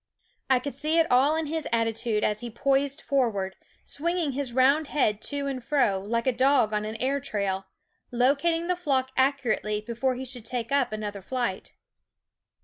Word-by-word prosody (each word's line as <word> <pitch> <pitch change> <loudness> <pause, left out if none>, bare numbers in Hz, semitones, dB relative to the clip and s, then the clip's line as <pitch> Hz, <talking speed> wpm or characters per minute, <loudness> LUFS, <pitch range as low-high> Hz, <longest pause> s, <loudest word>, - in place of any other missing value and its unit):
I 260 - +5
could 275 +3 -4
see 305 +5 0
it 330 - +5
all 270 +5 +5
in 320 0 -1
his 315 0 -3
attitude 225 -1 0
as 210 - +1
he 240 - -6
poised 275 +4 0
forward, 215 -9 0 0.3
swinging 340 0 -1
his 270 -1 -3
round 275 +5 +3
head 220 -8 +1
to 285 -1 -3
and 265 -3 -3
fro, 235 -8 +2
like 230 +4 -2
a 260 - +3
dog 255 -3 +3
on 210 0 0
an 215 +1 -5
air 265 +5 0
trail, 200 -7 -2 0.4
locating 280 +7 +2
the 360 +1 +1
flock 270 -7 0
accurately 260 -6 +1
before 235 +4 -2
he 260 +1 -5
should 250 -2 -5
take 235 +1 -4
another 215 -7 -1
flight. 235 -2 -3
255 Hz, 170 wpm, -26 LUFS, 220-280 Hz, 0.4 s, I